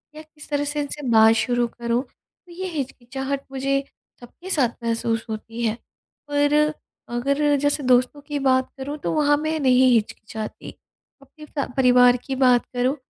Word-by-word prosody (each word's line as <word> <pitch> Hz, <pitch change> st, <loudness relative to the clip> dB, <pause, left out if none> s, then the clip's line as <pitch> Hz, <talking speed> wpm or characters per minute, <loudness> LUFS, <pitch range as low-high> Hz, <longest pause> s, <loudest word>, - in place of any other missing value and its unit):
या 310 Hz, -, -8 dB
किस 310 Hz, -1 st, -16 dB
तरह 290 Hz, 0 st, 0 dB
से 295 Hz, +1 st, -3 dB
इनसे 285 Hz, -1 st, -5 dB
बात 220 Hz, 0 st, +6 dB
शुरू 240 Hz, 0 st, +1 dB
करूँ? 235 Hz, +1 st, -2 dB
तो 345 Hz, +6 st, -25 dB
ये 375 Hz, +2 st, -5 dB
हिचकिचाहट 270 Hz, -2 st, -4 dB
मुझे 275 Hz, +1 st, 0 dB, 0.4 s
सबके 345 Hz, +10 st, -12 dB
साथ 270 Hz, -10 st, +2 dB
महसूस 230 Hz, -1 st, -1 dB
होती 225 Hz, +2 st, -6 dB
है 220 Hz, +1 st, -1 dB, 0.5 s
पर 290 Hz, 0 st, +2 dB, 0.6 s
अगर 280 Hz, +4 st, +1 dB
जैसे 290 Hz, 0 st, +1 dB
दोस्तों 255 Hz, +3 st, +2 dB
की 290 Hz, 0 st, -4 dB
बात 260 Hz, -1 st, +2 dB
करूँ 285 Hz, +3 st, -5 dB
तो -, -, -1 dB
वहाँ 290 Hz, -1 st, +3 dB
मैं 310 Hz, +1 st, -2 dB
नहीं 255 Hz, -1 st, +4 dB
हिचकिचाती। 220 Hz, 0 st, -3 dB, 0.5 s
अपने 300 Hz, +3 st, -15 dB
स 280 Hz, -, 0 dB
परिवार 250 Hz, -1 st, +5 dB
की 270 Hz, -, -3 dB
बात 250 Hz, -2 st, +4 dB
करूँ 255 Hz, +3 st, +1 dB
265 Hz, 160 wpm, -23 LUFS, 245-290 Hz, 0.6 s, बात